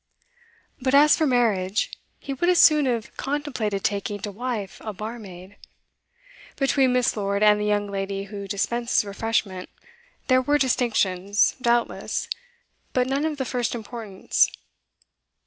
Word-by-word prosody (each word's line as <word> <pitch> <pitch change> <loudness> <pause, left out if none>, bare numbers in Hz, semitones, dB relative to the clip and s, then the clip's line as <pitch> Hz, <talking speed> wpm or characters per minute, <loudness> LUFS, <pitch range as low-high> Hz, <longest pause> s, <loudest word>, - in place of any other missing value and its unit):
But 260 +1 +2
as 295 +1 +7
for 315 - +1
marriage, 215 -6 +1 0.3
he 275 - -5
would 345 +7 0
as 360 - +4
soon 300 -4 +6
have 235 -3 -2
contemplated 265 -9 -2
taking 205 0 -2
to 205 - -4
wife 220 -2 -5
a 215 - -5
barmaid. 205 -3 -9 1.0
Between 270 -2 +2
Miss. 250 -1 +2
Lord 200 -1 -1
and 210 0 +5
the - - -1
young 205 0 +1
lady 195 0 -3
who 200 0 -7
dispenses 235 +3 0
refreshment 200 -2 -2 0.6
there 255 -1 +4
were 290 +3 +2
distinctions, 205 -7 +1
doubtless, 240 0 0 0.7
but 250 -1 +2
none 275 +3 -1
of 310 -2 -2
the 265 - -2
first 245 -1 -2
importance. 220 -4 0
225 Hz, 135 wpm, -24 LUFS, 200-255 Hz, 1.0 s, as